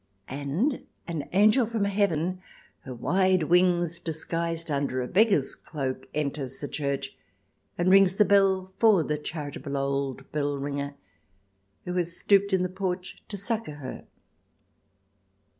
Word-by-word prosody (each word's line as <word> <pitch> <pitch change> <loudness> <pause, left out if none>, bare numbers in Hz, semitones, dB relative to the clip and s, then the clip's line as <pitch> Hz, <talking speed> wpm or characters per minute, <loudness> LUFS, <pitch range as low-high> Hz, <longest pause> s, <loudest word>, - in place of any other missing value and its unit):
And 150 - -1 0.2
an 160 -4 -4
angel 215 +5 +5
from 225 -2 -1
Heaven, 185 -3 0 0.4
her 130 - -6
wide 185 +7 +2
wings 175 0 +3
disguised 165 0 -3
under 140 -2 0
a 125 - -2
beggar's 195 - +3
cloak, 130 -4 -5
enters 140 -3 -2
the 145 - -4
church, 140 -2 -3 0.6
and 175 +1 +2
rings 195 -1 +6
the 210 - +5
bell 190 -2 +3
for 215 -7 +5
the 150 0 -2
charitable 145 -2 -5
old 135 -1 -2
bellringer, 140 -1 -2 0.9
who 180 - -3
has 175 -1 -2
stooped 200 0 +3
in 190 -1 +2
the - - +1
porch 185 0 -4
to 205 - -5
succour 215 -5 -2
her. 135 -3 -8
170 Hz, 130 wpm, -27 LUFS, 140-190 Hz, 0.9 s, rings